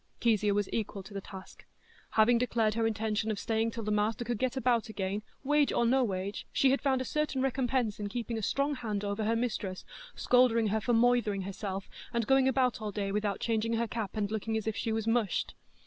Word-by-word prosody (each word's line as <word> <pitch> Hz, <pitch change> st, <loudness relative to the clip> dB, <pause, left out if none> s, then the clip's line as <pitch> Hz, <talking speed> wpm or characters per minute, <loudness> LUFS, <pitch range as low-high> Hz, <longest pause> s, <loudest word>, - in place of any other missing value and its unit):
Kezia 215 Hz, -3 st, +2 dB
was 205 Hz, -1 st, +1 dB
equal 205 Hz, -3 st, -3 dB
to 195 Hz, +2 st, -12 dB
the 195 Hz, -, -4 dB
task. 190 Hz, 0 st, -11 dB, 0.5 s
Having 230 Hz, +2 st, +5 dB
declared 230 Hz, -3 st, +1 dB
her 225 Hz, 0 st, +1 dB
intention 220 Hz, 0 st, -1 dB
of 215 Hz, -, -1 dB
staying 225 Hz, +1 st, 0 dB
till 230 Hz, 0 st, -6 dB
the 210 Hz, -, -2 dB
master 215 Hz, +3 st, 0 dB
could 240 Hz, -3 st, -2 dB
get 260 Hz, 0 st, -1 dB
about 240 Hz, -2 st, +1 dB
again, 200 Hz, -1 st, -2 dB, 0.2 s
"wage 295 Hz, +1 st, +3 dB
or 235 Hz, -, +2 dB
no 260 Hz, +3 st, +3 dB
wage," 195 Hz, -2 st, -3 dB
she 270 Hz, -, +3 dB
had 275 Hz, -, +1 dB
found 265 Hz, -2 st, +1 dB
a -, -, -3 dB
certain 300 Hz, -2 st, -1 dB
recompense 255 Hz, -4 st, 0 dB
in 205 Hz, -1 st, -3 dB
keeping 235 Hz, +1 st, -3 dB
a 220 Hz, -, -2 dB
strong 280 Hz, +7 st, 0 dB
hand 215 Hz, -6 st, -3 dB
over 205 Hz, +1 st, -2 dB
her 225 Hz, +2 st, +2 dB
mistress, 210 Hz, -5 st, -3 dB, 0.3 s
scolding 235 Hz, -3 st, +3 dB
her 220 Hz, +2 st, 0 dB
for 240 Hz, -, 0 dB
"moithering" 230 Hz, -4 st, +3 dB
herself, 195 Hz, 0 st, -5 dB, 0.2 s
and 235 Hz, -1 st, 0 dB
going 270 Hz, +1 st, +4 dB
about 255 Hz, -3 st, +1 dB
all 210 Hz, -1 st, -3 dB
day 200 Hz, -1 st, -2 dB
without 205 Hz, -1 st, -1 dB
changing 225 Hz, 0 st, 0 dB
her 230 Hz, +1 st, 0 dB
cap, 220 Hz, -2 st, -4 dB
and 205 Hz, -1 st, -1 dB
looking 220 Hz, +1 st, -1 dB
as 220 Hz, -, -4 dB
if 220 Hz, -1 st, -1 dB
she 225 Hz, -, -2 dB
was 220 Hz, -1 st, -1 dB
"mushed." 225 Hz, -4 st, 0 dB
225 Hz, 220 wpm, -30 LUFS, 210-245 Hz, 0.5 s, Having